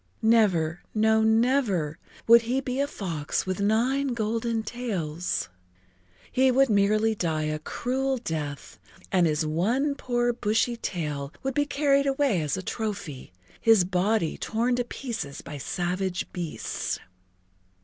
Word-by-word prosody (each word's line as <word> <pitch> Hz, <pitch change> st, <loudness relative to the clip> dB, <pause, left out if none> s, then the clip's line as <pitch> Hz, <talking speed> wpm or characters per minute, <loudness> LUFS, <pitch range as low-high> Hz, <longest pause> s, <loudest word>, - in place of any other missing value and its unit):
Never, 185 Hz, -8 st, +3 dB
no, 220 Hz, +1 st, +4 dB
never, 220 Hz, -, +2 dB, 0.3 s
would 235 Hz, +1 st, +8 dB
he 245 Hz, +4 st, 0 dB
be 260 Hz, 0 st, -3 dB
a 280 Hz, -, +2 dB
fox 165 Hz, -, -3 dB
with 185 Hz, 0 st, -2 dB
nine 245 Hz, +6 st, +1 dB
golden 225 Hz, 0 st, -1 dB
tails! 185 Hz, -9 st, -3 dB, 0.8 s
He 260 Hz, +1 st, +4 dB
would 265 Hz, -1 st, +4 dB
merely 215 Hz, +2 st, +3 dB
die 160 Hz, -6 st, -1 dB
a 155 Hz, 0 st, -2 dB
cruel 260 Hz, -, -1 dB
death 155 Hz, -, -5 dB, 0.3 s
and 180 Hz, -3 st, +4 dB
his 155 Hz, 0 st, 0 dB
one 230 Hz, -, +1 dB
poor 240 Hz, -3 st, 0 dB
bushy 225 Hz, +2 st, +1 dB
tail 150 Hz, -10 st, -4 dB
would 270 Hz, 0 st, -1 dB
be 290 Hz, +2 st, +1 dB
carried 280 Hz, -1 st, +2 dB
away 270 Hz, -, +2 dB
as 150 Hz, +2 st, -1 dB
a 190 Hz, -, -5 dB
trophy, 200 Hz, -, -5 dB, 0.3 s
his 225 Hz, -5 st, +6 dB
body 185 Hz, -1 st, 0 dB
torn 235 Hz, +3 st, 0 dB
to 245 Hz, -, +1 dB
pieces 225 Hz, -, -5 dB
by 145 Hz, -, -7 dB
savage 180 Hz, +4 st, -2 dB
beasts. 170 Hz, -3 st, -3 dB
220 Hz, 135 wpm, -26 LUFS, 170-245 Hz, 0.8 s, would